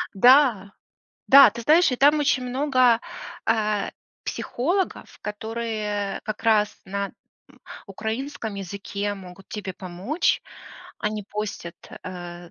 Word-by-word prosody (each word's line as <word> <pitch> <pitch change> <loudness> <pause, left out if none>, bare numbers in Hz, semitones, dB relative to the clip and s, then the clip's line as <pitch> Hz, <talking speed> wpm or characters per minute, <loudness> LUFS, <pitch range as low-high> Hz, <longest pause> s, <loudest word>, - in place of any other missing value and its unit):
Да. 240 -3 +5 0.6
Да, 275 -4 +9
ты 235 - -8
знаешь, 320 +4 +5
и 250 - -1
там 290 +4 +5
очень 275 -3 +1
много, 255 -2 +3 0.5
э, 215 -2 +1 0.3
психологов, 350 +10 -2
которые 210 -2 -3
как 215 -1 -5
раз 215 -2 +2
на, 200 +1 -3 0.4
м, - - -22 0.3
украинском 220 +3 -4
языке 200 +1 -4
могут 190 -1 -12
тебе 200 -3 -5
помочь. 185 - -1 0.6
Они 210 0 -2
постят, 210 -5 -5
э, - - -10
м, 175 -1 -9
215 Hz, 115 wpm, -24 LUFS, 200-255 Hz, 0.6 s, Да